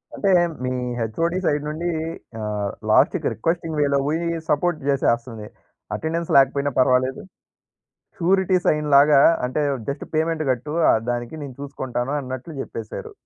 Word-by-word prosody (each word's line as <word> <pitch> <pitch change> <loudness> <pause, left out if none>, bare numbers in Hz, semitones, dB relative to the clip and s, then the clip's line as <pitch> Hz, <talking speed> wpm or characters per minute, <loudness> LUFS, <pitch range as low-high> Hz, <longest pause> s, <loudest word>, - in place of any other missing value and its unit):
అంటే, 200 - 0 0.3
మీ 130 - -1 0.3
HOD 165 +11 -1
side 145 0 +1
నుండి 165 +3 -3 0.5
ఆహ్, 105 -1 -2 0.2
లాస్ట్‌కి - - +3
రిక్వెస్టింగ్ 165 +4 -2
వేలో 140 -1 +2
పోయి 165 +3 -1 0.2
సపోర్ట్ 160 +3 +1
చేసేస్తుంది. 120 -5 0 0.5
అటెండెన్స్ 165 +1 -3
లేకపోయినా 140 +1 +3
పర్వాలేదు. 130 0 +2 1.0
షూరిటీ 190 +1 +2
సైన్‌లాగా 150 -1 +5 0.3
అంటే 140 +4 -1 0.3
జస్ట్ 140 +1 -4
పేమెంట్ 160 0 0
కట్టు 130 +4 -4 0.2
ఆహ్, - - +4
దానికి 120 +4 -4
నేను 135 -3 -8
చూసుకుంటాను 130 -2 -4
అన్నట్లు 130 +4 -7
చెప్పేశారు. 115 -4 -7
140 Hz, 120 wpm, -22 LUFS, 125-160 Hz, 1.0 s, సైన్‌లాగా